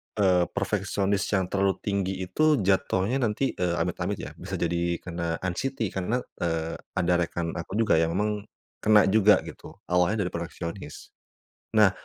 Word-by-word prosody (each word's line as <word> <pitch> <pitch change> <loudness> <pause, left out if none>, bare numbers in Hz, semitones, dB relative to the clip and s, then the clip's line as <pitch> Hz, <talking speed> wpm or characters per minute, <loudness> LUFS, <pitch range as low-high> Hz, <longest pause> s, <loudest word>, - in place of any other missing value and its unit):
eee, 90 -4 +4
perfeksionis 100 0 -1
yang 95 -1 +2
terlalu 100 -1 +2
tinggi 95 -2 -1
itu 155 - +3
jatuhnya 100 +5 +2
nanti 120 +2 0
eee, 90 -1 +1
amit-amit 90 +3 -1
ya, - - -6
bisa - - -5
jadi 85 0 0
kena 85 -2 -3
anxiety 110 +4 -2
karena, 105 +7 -1 0.2
eee, 80 -1 -2 0.2
ada 90 -1 +2
rekan 85 -1 -2
aku 85 +3 -6
juga 110 -8 +4
yang 80 +1 +1
memang 105 +1 -1 0.3
kena 105 -1 +6
juga 105 0 +6
gitu - - -10 0.2
awalnya 90 +4 +3
dari 90 - -3
perfeksionis. 85 -1 -6 0.6
Nah, 105 -3 +6
95 Hz, 150 wpm, -27 LUFS, 85-105 Hz, 0.6 s, kena